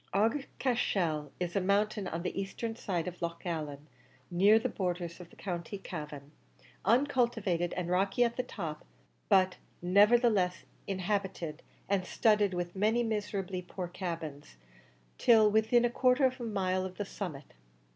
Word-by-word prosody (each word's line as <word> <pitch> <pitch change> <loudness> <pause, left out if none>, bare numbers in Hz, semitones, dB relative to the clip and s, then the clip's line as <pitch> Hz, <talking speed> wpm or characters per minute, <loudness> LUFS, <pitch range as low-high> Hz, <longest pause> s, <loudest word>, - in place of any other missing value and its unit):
Aughacashel 205 - 0
is 175 -1 -3
a 195 - +2
mountain 205 +1 +1
on 170 0 -4
the 185 +2 -2
eastern 225 +3 -4
side 185 -7 -2
of 180 0 -7
Loch 170 +1 -4
Allen, 150 -4 -4 0.5
near 200 +5 +6
the 225 - 0
borders 175 -2 -3
of 175 -2 -11
the - - -18
County 180 +1 -4
Cavan 150 -6 -7 0.5
uncultivated 235 -9 +2
and 180 -2 -3
rocky 195 +6 +2
at 235 -1 0
the - - 0
top, 170 -11 -6 0.5
but 185 -1 +4 0.2
nevertheless 200 0 +4 0.2
inhabited, 190 -4 -2 0.3
and 195 -2 +1
studded 210 0 +2
with 175 0 -3
many 220 +5 +2
miserably 200 -4 -2
poor 180 0 -6
cabins, 165 - -6 0.6
till 220 -3 +6
within 220 +3 +4
about 240 - +1
a - - -12
quarter 255 +1 +5
of 260 0 0
a - - -3
mile 185 -4 0
of 185 -1 -6
the 205 - -2
summit. 160 -8 -7
190 Hz, 150 wpm, -31 LUFS, 175-215 Hz, 0.6 s, near